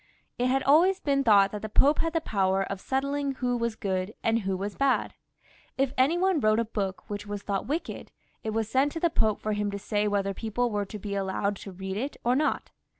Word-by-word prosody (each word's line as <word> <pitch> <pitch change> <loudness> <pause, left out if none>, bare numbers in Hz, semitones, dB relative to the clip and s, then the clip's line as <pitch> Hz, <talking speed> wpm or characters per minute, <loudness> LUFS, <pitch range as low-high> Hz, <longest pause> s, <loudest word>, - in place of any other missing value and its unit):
It 250 - +2
had 265 +1 +1
always 350 +7 +5
been 275 -1 +1
thought 200 -4 +5
that 210 - -5
the 215 - -5
Pope 285 +7 +4
had 330 -1 0
the 330 - +1
power 195 -6 +1
of 195 0 -5
settling 275 +1 -1
who 250 -1 -1
was 235 -2 -1
good 190 0 -2
and 225 0 +2
who 190 -3 -2
was 200 +2 -4
bad. 275 -1 +1 0.6
If 270 -1 +1
any 275 +7 +3
one 370 -2 +2
wrote 215 -3 +3
a 230 - +1
book 195 -3 -4
which 205 0 -5
was 205 0 -5
thought 200 -2 -2
wicked, 310 +5 -4 0.3
it 220 - -2
was 220 0 -1
sent 270 +5 +2
to 330 - -3
the 340 0 +2
Pope 215 -6 +1
for 215 - -2
him 210 0 -1
to 200 - -4
say 210 +1 -1
whether 200 -1 0
people 225 +4 -1
were 205 -1 -1
to 210 - -7
be 200 0 -5
allowed 200 +1 -1
to 195 - -9
read 190 +1 -5
it 270 +6 -3
or 245 +1 +3
not. 300 +3 0
220 Hz, 235 wpm, -27 LUFS, 200-270 Hz, 0.6 s, always